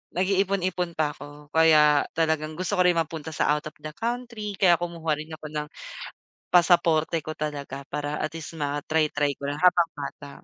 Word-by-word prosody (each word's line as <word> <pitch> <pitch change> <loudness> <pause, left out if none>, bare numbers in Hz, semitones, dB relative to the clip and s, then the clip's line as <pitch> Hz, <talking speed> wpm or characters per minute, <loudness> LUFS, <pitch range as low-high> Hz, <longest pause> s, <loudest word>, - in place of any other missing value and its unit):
nag-iipon-ipon 185 -2 0
pa 155 -2 +1
ako, 145 0 -12
kaya 155 -2 +5
talagang 160 -1 0
gusto 185 +4 -3
ko - - +7
rin 175 - +4
mapunta 160 -1 -3
sa - - +2
out 150 0 -3
of 155 - -10
the 155 - -5
country 230 -3 -4
kaya 175 -3 +4
kumuha 165 -3 -2
rin 155 +1 -7
ako 155 - -13
ng 150 -1 -3 0.8
pasaporte 170 -2 +4
ko 155 - -5
talaga 140 -3 -5
para 145 +1 -3
at 155 - -2
least 160 - -7
ma-try 145 +2 0
try 145 -1 +1
ko 140 - -4
lang 145 +1 -3
habang 175 -2 +5
bata. 145 0 -7
160 Hz, 180 wpm, -26 LUFS, 150-175 Hz, 0.8 s, ko